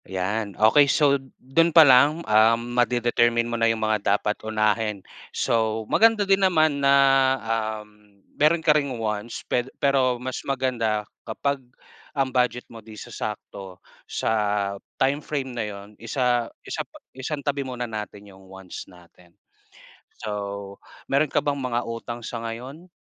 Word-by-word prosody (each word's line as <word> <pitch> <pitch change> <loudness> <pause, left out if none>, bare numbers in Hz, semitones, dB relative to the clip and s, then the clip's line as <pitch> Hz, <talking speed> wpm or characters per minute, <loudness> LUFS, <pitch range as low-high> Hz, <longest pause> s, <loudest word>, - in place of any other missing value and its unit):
Yan, 100 +2 -3
okey. 140 +7 +5
So 140 -2 +3 0.2
dun 165 +6 +2
pa 165 -1 +8
lang, 145 +5 +5
ah, 110 +2 +5
ma-de-determine 120 0 +1
mo 120 - -5
na 115 -1 +2
yung 110 -1 0
mga 105 -2 +2
dapat 105 - -1
unahin 110 -2 -1 0.2
so 110 -1 0
maganda 225 - +4
din 195 0 +3
naman 155 -6 +3
na, 140 0 +4 0.4
um, 105 -3 -5 0.2
meron 155 +2 +2
ka 155 - +6
ring 140 -4 -1
wants 110 0 -4
ped 125 +1 -1
pero 130 -3 +2
mas 125 +1 -5
maganda 120 -6 -1 0.2
kapag 140 +5 -2 0.6
ang 135 -2 0
budget 125 -1 +1
mo 115 - -10
di 110 0 -13
sasakto 100 -3 -7 0.3
sa - - -2 0.7
time 140 +2 +1
frame 135 -3 -4
na 120 -2 -2
yun, 100 +1 -10
isa 120 0 0 0.2
isa - - -3
pa - - -12 0.2
isantabi 140 +1 -3
muna 125 -2 -4
natin 105 -2 -7
'yong 95 -1 -16
wants 95 -1 -10
natin. 90 -1 -20 0.8
So 100 -2 -5 0.3
meron 140 +1 +1
ka - - +1
bang 145 -1 +1
mga 120 -2 -1
utang 115 +1 -6
sa 115 -1 -5
ngayon? 130 +10 -8
120 Hz, 145 wpm, -24 LUFS, 105-135 Hz, 0.8 s, pa